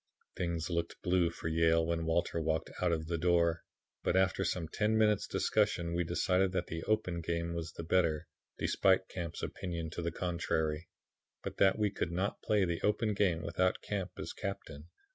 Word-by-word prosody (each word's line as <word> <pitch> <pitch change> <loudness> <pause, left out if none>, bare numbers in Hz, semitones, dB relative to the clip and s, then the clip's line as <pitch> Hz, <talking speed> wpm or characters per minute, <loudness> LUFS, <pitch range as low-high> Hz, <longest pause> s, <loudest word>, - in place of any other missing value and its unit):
Things 85 -2 -2
looked 85 0 -2
blue 90 -2 +3
for 85 - -6
Yale 80 0 +3
when 80 0 -1
Walter 85 0 +1
walked 80 0 -1
out 90 -1 +3
of 80 -1 -1
the 85 +1 -2
door, 85 -1 +3 0.4
but - - +1
after 95 0 +2
some 85 -3 -1
ten 105 +6 +1
minutes' 105 -2 +3
discussion 100 -6 +1
we 85 +1 +1
decided 90 +2 +1
that 90 -1 0
the 80 -1 -5
open 90 -5 0
game 85 0 -2
was 85 -1 -4
the - - -6
better, 85 -2 +1 0.3
despite 95 -1 +2
Camp's 85 -2 -5
opinion 85 -4 -4
to 85 - -4
the 85 - -1
contrary, 85 -2 -1 0.5
but - - -5
that 95 -1 +4
we 105 -2 +1
could 90 -3 -2
not 95 +4 -1
play 105 -3 +2
the 85 -1 -2
open 105 +1 +1
game 90 -5 +1
without 90 +3 0
Camp 100 -3 -2
as - - -5
captain. 80 -6 -6
85 Hz, 180 wpm, -33 LUFS, 80-95 Hz, 0.5 s, that